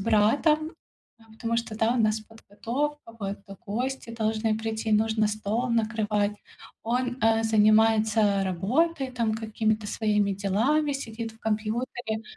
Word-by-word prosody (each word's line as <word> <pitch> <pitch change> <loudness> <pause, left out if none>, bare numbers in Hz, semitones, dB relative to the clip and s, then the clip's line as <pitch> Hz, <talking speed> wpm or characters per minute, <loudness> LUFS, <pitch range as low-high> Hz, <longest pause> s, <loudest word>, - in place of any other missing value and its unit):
братом, 255 +10 +3 0.6
потому 230 +1 -2
что, 230 -2 -3
да, 225 +1 +2
у 250 - 0
нас 215 -1 +2
подготовка, 230 +5 -5
вот, 200 -1 -4
э, 195 - -9
гости 245 +4 -3
должны 220 -1 0
прийти, 220 0 -2
нужно 220 0 +2
стол 215 +4 -2
накрывать. 215 -2 0 0.5
Он, 245 +2 -1
э, 225 0 +4
занимается 215 -1 +4
работой, 260 - 0
там, 230 -3 -1
какими-то 220 -1 -1
своими 210 -1 +1
делами, 230 +10 +1
сидит 225 -3 -5
в 225 - -21
компьютере, 220 +1 -2
220 Hz, 125 wpm, -26 LUFS, 215-235 Hz, 0.6 s, э